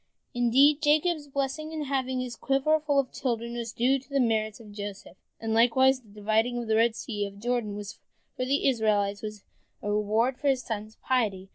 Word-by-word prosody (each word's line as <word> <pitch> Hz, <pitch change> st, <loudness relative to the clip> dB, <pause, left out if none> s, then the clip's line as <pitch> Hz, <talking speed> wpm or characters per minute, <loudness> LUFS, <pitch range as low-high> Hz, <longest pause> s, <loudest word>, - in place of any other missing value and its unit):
Indeed, 270 Hz, +5 st, +4 dB
Jacob's 310 Hz, 0 st, +2 dB
blessing 280 Hz, +3 st, -3 dB
in 315 Hz, -1 st, -3 dB
having 260 Hz, -2 st, -1 dB
his 250 Hz, -2 st, -5 dB
quiver 275 Hz, +5 st, +2 dB
full 295 Hz, -2 st, 0 dB
of 275 Hz, -2 st, +1 dB
children 235 Hz, -3 st, -2 dB
was 235 Hz, -1 st, -4 dB
due 255 Hz, +4 st, +2 dB
to 270 Hz, -, -22 dB
the 280 Hz, -1 st, 0 dB
merits 220 Hz, -3 st, +1 dB
of 215 Hz, -3 st, -12 dB
Joseph, 205 Hz, -1 st, -7 dB, 0.2 s
and 225 Hz, -1 st, -2 dB
likewise 255 Hz, +3 st, +4 dB
the 220 Hz, -, -22 dB
dividing 220 Hz, +4 st, 0 dB
of 240 Hz, -1 st, -4 dB
the 220 Hz, -, +2 dB
Red 225 Hz, 0 st, +3 dB
Sea 205 Hz, -4 st, -3 dB
and 200 Hz, -, -11 dB
of -, -, -14 dB
the 235 Hz, -, -8 dB
Jordan 225 Hz, -4 st, -1 dB, 0.6 s
for 255 Hz, -, -2 dB
the 275 Hz, +3 st, +1 dB
Israelites 210 Hz, -5 st, +1 dB
was 210 Hz, -1 st, -7 dB, 0.4 s
the 205 Hz, -, -3 dB
reward 215 Hz, +5 st, +1 dB
for 290 Hz, -, -1 dB
his 265 Hz, -2 st, +2 dB
son's 215 Hz, -1 st, -5 dB
piety. 205 Hz, -7 st, 0 dB
240 Hz, 205 wpm, -27 LUFS, 215-270 Hz, 0.6 s, Indeed